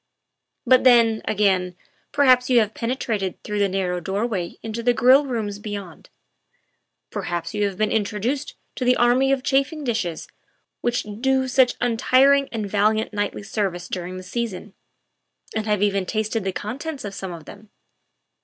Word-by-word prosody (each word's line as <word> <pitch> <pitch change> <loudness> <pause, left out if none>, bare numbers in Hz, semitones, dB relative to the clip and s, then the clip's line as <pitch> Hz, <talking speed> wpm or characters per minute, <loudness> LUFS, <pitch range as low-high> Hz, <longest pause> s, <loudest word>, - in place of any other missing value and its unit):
But 255 0 +5
then, 230 -3 +5
again, 190 -4 +1 0.4
perhaps 255 -3 +4
you 250 - +4
have 215 -1 0
penetrated 230 -6 -2
through 210 0 -3
the 200 -1 +2
narrow 185 -2 -1
doorway 195 0 -3
into 225 +1 -4
the 240 +1 +2
grill 265 +5 +5
rooms 215 -5 -3
beyond; 200 -5 -8 1.0
perhaps 170 0 -4
you 210 -1 0
have 195 -2 -3
been 215 +1 0
introduced 220 +6 -2 0.2
to - - -2
the 250 0 +4
army 250 +3 +3
of 270 -2 0
chafing 275 +4 0
dishes 220 - -2 0.5
which 240 0 -1 0.2
do 265 0 +2
such 255 -1 +3
untiring 260 +4 +3
and 220 -3 -3
valiant 215 +2 +1
nightly 205 0 -2
service 190 -4 -3
during 180 0 -5
the 185 - -8
season, 210 -1 -5 0.8
and 220 0 -2
have 210 -1 +1
even 200 -2 +1
tasted 215 +1 -1
the 190 - -1
contents 270 - -5
of 200 - -6
some 190 -1 -6
of 165 -3 -9
them. 210 +1 -13
215 Hz, 155 wpm, -23 LUFS, 195-250 Hz, 1.0 s, But